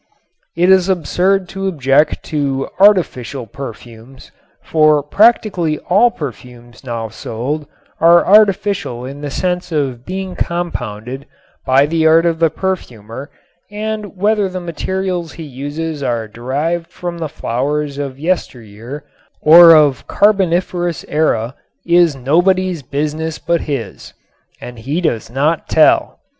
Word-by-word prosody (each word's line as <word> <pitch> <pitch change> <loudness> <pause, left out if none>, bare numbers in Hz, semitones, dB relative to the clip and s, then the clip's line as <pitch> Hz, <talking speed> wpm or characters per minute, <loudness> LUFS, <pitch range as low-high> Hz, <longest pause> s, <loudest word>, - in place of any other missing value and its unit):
It 175 +3 +3
is 190 0 +4
absurd 185 +2 +1
to 195 0 -4
object 145 -3 +1
to 140 -3 -2
"artificial" 140 - +2
perfumes, 120 +1 -11 0.3
for 155 -2 +3
practically 185 - +2
all 210 +6 +5
perfumes 125 - -10
now 115 -3 -4
sold 125 +8 -5 0.3
are 170 +1 +5
artificial 200 - +2
in 140 +2 -8
the 145 - -4
sense 180 +4 -2
of 135 -6 -2
being 185 +2 -5
compounded 135 - -4 0.4
by 135 +2 +4
the 160 +1 +1
art 165 +1 +5
of 165 -1 0
the 165 -1 +3
perfumer 135 - -5 0.4
and 210 -1 -5
whether 205 0 +1
the 185 0 -5
materials 175 0 -4
he 165 - -9
uses 145 +3 -5
are 120 -4 -2
derived 145 +10 -3
from 175 -1 -7
the 160 -2 -4
flowers 145 +2 -3
of 135 -2 -5
yesteryear 130 - -4 0.4
or 165 +1 +8
of 145 -4 +3
Carboniferous 180 -4 +1
Era 130 -6 0 0.3
is 170 -3 +3
nobody's 175 +6 +1
business 150 +4 -3
but 170 -1 -1
his. 140 -6 -6 0.5
And 125 -1 -10
he 140 +9 -2
does 120 -12 -2
not 145 +6 -1
tell. 155 - +3
155 Hz, 125 wpm, -16 LUFS, 135-180 Hz, 0.5 s, or